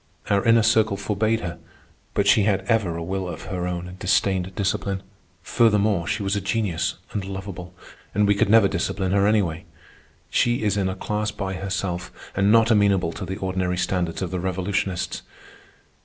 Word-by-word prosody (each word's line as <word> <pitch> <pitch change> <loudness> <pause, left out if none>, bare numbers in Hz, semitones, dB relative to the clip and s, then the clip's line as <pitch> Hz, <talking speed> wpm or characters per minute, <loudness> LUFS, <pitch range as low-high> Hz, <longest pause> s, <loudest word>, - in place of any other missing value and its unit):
Our 100 0 +3
Inner 115 -1 +5
Circle 110 -2 +3
forbade 110 +3 0
her, 85 -1 -5 0.6
but - - +2
she 110 - +5
had 100 -1 +2
ever 95 -5 0
a 85 - -4
will 95 +2 -3
of - - -7
her 90 -2 -3
own 90 0 -4
and 90 +1 -11
disdained 95 0 +1
discipline. 100 -1 -1 0.4
Furthermore, 105 -4 +2
she 105 - -1
was 95 +1 0
a 100 - -1
genius 100 -4 -1 0.2
and 100 - -3
lovable, 95 -2 -7 0.4
and 105 +1 +3
we 100 - +5
could 100 - +1
never 110 -2 +6
discipline 95 +1 -2
her 100 +1 +3
anyway. 95 -7 +1 0.7
She 120 -1 +2
is 105 -2 +1
in 95 -2 0
a 95 - -3
class 105 +2 -2
by 95 -2 -4
herself 95 -2 -3 0.2
and 100 +1 +3
not 115 +1 +5
amenable 100 -5 +3
to 95 +3 -6
the 95 +2 -5
ordinary 95 -2 -1
standards 90 -1 -1
of 90 - -4
the 90 - -2
revolutionists. 95 0 -2
95 Hz, 180 wpm, -23 LUFS, 90-105 Hz, 0.7 s, never